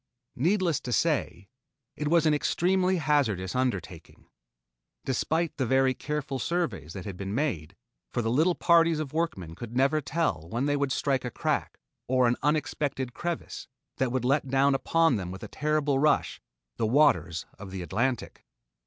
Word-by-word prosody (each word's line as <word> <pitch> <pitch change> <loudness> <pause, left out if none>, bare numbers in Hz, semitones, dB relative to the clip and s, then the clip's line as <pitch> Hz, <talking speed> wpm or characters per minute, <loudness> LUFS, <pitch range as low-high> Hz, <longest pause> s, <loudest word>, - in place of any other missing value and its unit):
Needless 175 - +2
to 125 - -6
say, 95 -3 0 0.5
it 150 - -3
was 165 +1 +3
an 155 - +4
extremely 185 +5 +1
hazardous 130 - 0
undertaking, 95 -10 -3 0.8
despite 160 +6 0
the 130 - 0
very 130 +1 +3
careful 145 -1 -4
surveys 120 - -2
that 95 -3 -7
had 100 - -5
been 100 +2 -4
made, 100 - -2 0.4
for 120 - -1
the 115 - 0
little 160 +8 +3
parties 165 -1 +4
of 155 -3 -4
workmen 135 - -2
could 120 +6 -7
never 140 +4 +3
tell 145 - -2
when 120 +7 -1
they 145 0 +1
would 140 -1 0
strike 135 -1 0
a 125 - -3
crack - - -2 0.3
or 130 -1 +3
an 120 - +2
unexpected 145 -3 -1
crevice 175 -1 -5 0.3
that 130 -1 0
would 130 -1 -1
let 140 +2 +2
down 135 +1 +3
upon 165 0 +2
them 90 -3 -4
with 95 +1 -8
a - - -5
terrible 150 -1 0
rush, 150 +1 +1 0.4
the 110 - +1
waters 90 - +3
of 100 -1 -8
the 95 -1 -5
Atlantic. 120 +9 -2
135 Hz, 165 wpm, -28 LUFS, 115-155 Hz, 0.8 s, an